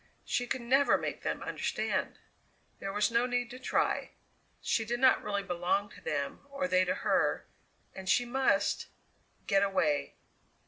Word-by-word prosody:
She 245 Hz, -, -1 dB
could 255 Hz, -, -2 dB
never 270 Hz, +4 st, +4 dB
make -, -, -4 dB
them -, -, -3 dB
understand! -, -, -2 dB, 0.6 s
There 195 Hz, -, -4 dB
was 210 Hz, +3 st, +1 dB
no 235 Hz, +2 st, +2 dB
need 245 Hz, 0 st, -1 dB
to 255 Hz, -, -8 dB
try. 265 Hz, -, 0 dB, 0.5 s
She 225 Hz, -, 0 dB
did 240 Hz, +2 st, -2 dB
not 260 Hz, 0 st, +5 dB
really 200 Hz, -1 st, -1 dB
belong 185 Hz, +2 st, 0 dB
to -, -, -14 dB
them, 140 Hz, -2 st, -2 dB
or 275 Hz, 0 st, -2 dB
they 185 Hz, -6 st, +3 dB
to 180 Hz, -, 0 dB
her, -, -, +2 dB, 0.5 s
and 190 Hz, -1 st, -7 dB
she 245 Hz, -, +4 dB
must 240 Hz, -5 st, +1 dB, 0.6 s
get 195 Hz, -2 st, +3 dB
away! 155 Hz, -8 st, +1 dB
210 Hz, 155 wpm, -31 LUFS, 190-245 Hz, 0.6 s, not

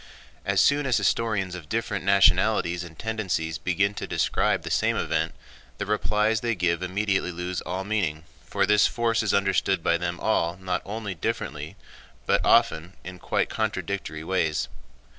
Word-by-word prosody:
As -, -, +1 dB
soon 145 Hz, -1 st, +3 dB
as 125 Hz, -, +3 dB
historians 105 Hz, -5 st, 0 dB
of 85 Hz, -4 st, -8 dB
different 110 Hz, -2 st, -2 dB
nationalities 95 Hz, -3 st, +3 dB
and 85 Hz, -2 st, -12 dB
tendencies 90 Hz, -7 st, -2 dB
begin 100 Hz, +3 st, +1 dB
to -, -, -5 dB
describe -, -, +1 dB
the -, -, -5 dB
same -, -, +2 dB
event, -, -, -1 dB, 0.4 s
the 105 Hz, -, -3 dB
replies 105 Hz, +1 st, +1 dB
they 115 Hz, -2 st, 0 dB
give 85 Hz, -2 st, 0 dB
immediately 95 Hz, 0 st, 0 dB
lose 90 Hz, +1 st, -4 dB
all 90 Hz, +3 st, -4 dB
meaning, 95 Hz, -7 st, -1 dB, 0.2 s
for -, -, 0 dB
this 105 Hz, 0 st, +5 dB
force 115 Hz, -1 st, 0 dB
is 110 Hz, -, 0 dB
understood 95 Hz, -2 st, +1 dB
by 85 Hz, -, +2 dB
them 85 Hz, 0 st, -3 dB
all 85 Hz, -6 st, 0 dB
not 95 Hz, -1 st, -2 dB
only 105 Hz, -1 st, -4 dB
differently 80 Hz, -, -4 dB, 0.5 s
but -, -, +2 dB
often 90 Hz, -7 st, +3 dB
in 90 Hz, 0 st, -9 dB
quite -, -, 0 dB
contradictory 100 Hz, -7 st, -3 dB
ways. 80 Hz, -3 st, 0 dB
95 Hz, 160 wpm, -26 LUFS, 85-105 Hz, 0.5 s, this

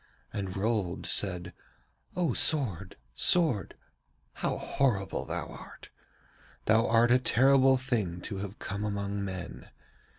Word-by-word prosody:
And 95 Hz, -2 st, -4 dB
Rold 100 Hz, -4 st, -1 dB
said: 90 Hz, -3 st, -1 dB, 0.6 s
'O 170 Hz, -8 st, +1 dB
sword, 100 Hz, -, +1 dB, 0.2 s
sword! 155 Hz, -, +2 dB, 0.6 s
How -, -, -2 dB
horrible 110 Hz, -9 st, -1 dB
thou -, -, -4 dB
art! -, -, -12 dB, 0.7 s
Thou 110 Hz, +2 st, +3 dB
art 115 Hz, +1 st, +4 dB
a 125 Hz, -, +6 dB
terrible 130 Hz, +1 st, +4 dB
thing 110 Hz, -10 st, -2 dB
to 100 Hz, -, -5 dB
have 100 Hz, +1 st, -6 dB
come 100 Hz, +1 st, -5 dB
among 100 Hz, -1 st, -2 dB
men. 95 Hz, -3 st, -6 dB
105 Hz, 120 wpm, -29 LUFS, 95-130 Hz, 0.7 s, a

